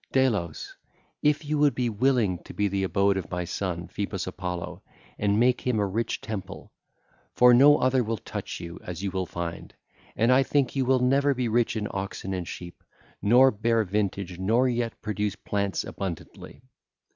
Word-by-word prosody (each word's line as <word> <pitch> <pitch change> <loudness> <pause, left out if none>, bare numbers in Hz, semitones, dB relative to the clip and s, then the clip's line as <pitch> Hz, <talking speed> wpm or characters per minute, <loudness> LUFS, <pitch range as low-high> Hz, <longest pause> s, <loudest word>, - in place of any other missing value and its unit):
51 - - -11 0.2
61) - - 0
'Delos, 85 -6 -5 0.5
if 150 +1 +2
you 150 +1 -1
would 145 -4 +3
be 125 0 0
willing 115 -5 +1
to - - -12
be 105 - +1
the 100 0 -1
abode 100 +1 +2
of 90 -3 -5
my 90 0 -2
son 90 -1 -3
Phoebus 100 -2 -4
Apollo 90 -2 -5 0.4
and 100 0 +2
make 125 +1 +3
him 125 -3 0
a 105 - +2
rich 110 +4 -2
temple—; 105 -4 -7 0.6
for 125 0 +7
no 145 +4 +7
other 130 0 +2
will 115 0 -2
touch - - -6
you, 85 0 -8
as 90 +2 -6
you 100 - -1
will 95 -1 -2
find: 85 0 -6 0.4
and 115 +4 +3
I 130 +1 +6
think 140 -1 +1
you 135 -1 +1
will 130 0 +3
never 140 +2 +3
be 125 -1 -1
rich 115 +1 +1
in 105 -1 -2
oxen 95 0 -4
and 90 -2 -4
sheep, 85 -1 -9 0.4
nor 125 +5 +6
bear 115 +1 +1
vintage 95 -2 -2
nor 115 +7 +2
yet 120 -2 -2
produce 105 -1 -2
plants 100 -2 -2
abundantly. 95 -5 -7
105 Hz, 185 wpm, -26 LUFS, 95-125 Hz, 0.6 s, for